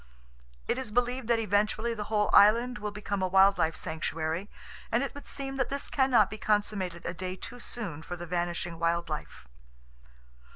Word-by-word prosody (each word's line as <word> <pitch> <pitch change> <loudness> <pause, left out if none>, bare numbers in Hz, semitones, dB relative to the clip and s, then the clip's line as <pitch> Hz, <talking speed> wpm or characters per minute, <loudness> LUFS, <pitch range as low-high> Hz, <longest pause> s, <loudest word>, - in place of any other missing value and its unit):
It 255 - 0
is 260 -4 -4
believed 245 +2 0
that 235 -1 +3
eventually 215 +2 +1
the 210 -2 -4
whole 210 -1 +1
island 235 +4 +6
will 210 0 -3
become 205 -1 -3
a 185 - +2
wild 195 +1 +5
life 160 0 +2
sanctuary, 160 +3 -3 0.4
and 235 +4 +2
it 275 - -4
would 285 - -10
seem 270 -1 -4
that 265 - 0
this 280 0 -4
can 265 -1 +2
not 215 -6 +5
be 215 - -6
consummated 200 -5 0
a 175 - -2
day 185 +1 -4
too 245 +6 -8
soon 200 -11 -4
for 175 +2 -6
the 175 0 -7
vanishing 175 -1 -2
wild 170 0 0
life. 150 - -6
205 Hz, 190 wpm, -29 LUFS, 175-235 Hz, 0.4 s, island